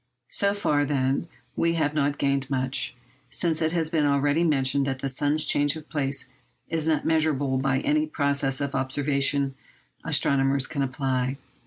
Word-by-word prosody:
So 200 -1 +1
far, 150 -8 +1
then, 135 +2 0 0.3
we 170 0 +1
have 150 -2 0
not 145 -1 0
gained 140 -1 0
much, 130 -1 -1 0.3
since 165 +1 0
it 160 0 +1
has 160 -2 0
been 155 -3 +2
already 145 +3 +2
mentioned 140 -3 +2
that 135 -1 -1
the 135 - -3
sun's 145 +3 0
change 145 +1 +2
of 155 -1 -9
place 140 -3 -1 0.4
is 160 -1 -2
not 155 -2 +1
measurable 145 -4 +1
by 135 0 +1
any 305 +1 +1
process 140 - 0
of 140 -1 -2
observation 140 0 +1 0.5
astronomers 135 0 +2
can 140 0 -3
apply. 130 -1 -1
140 Hz, 160 wpm, -25 LUFS, 135-155 Hz, 0.5 s, been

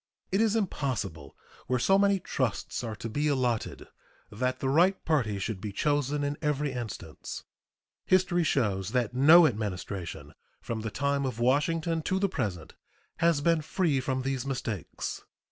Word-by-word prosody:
It 195 +3 +2
is 225 -1 +3
impossible, 130 - -2 0.3
where 125 - +1
so 195 +11 +4
many 200 -1 +3
trusts 130 - -2
are 110 -2 -4
to 115 - -6
be 145 +7 -1
allotted, 125 -6 -1 0.4
that 125 +5 -1
the 135 - -1
right 175 +8 +3
parties 110 - +1
should 105 -3 -4
be 105 - -4
chosen 145 +5 0
in 145 0 -2
every 150 -2 0
instance. 110 -10 -6 0.6
History 185 -2 +3
shows 105 - 0
that 125 -1 +1
no 155 +7 +8
Administration 100 - -3 0.3
from 115 -2 -4
the 110 - -3
time 140 +3 0
of 130 -4 -3
Washington 160 +6 +1
to 185 +4 0
the 200 +1 +1
present 95 - -3 0.4
has 165 -3 +3
been 165 +1 +3
free 155 -3 0
from 130 0 -2
these 135 -2 -1
mistakes. 120 - -4
135 Hz, 155 wpm, -29 LUFS, 110-160 Hz, 0.6 s, no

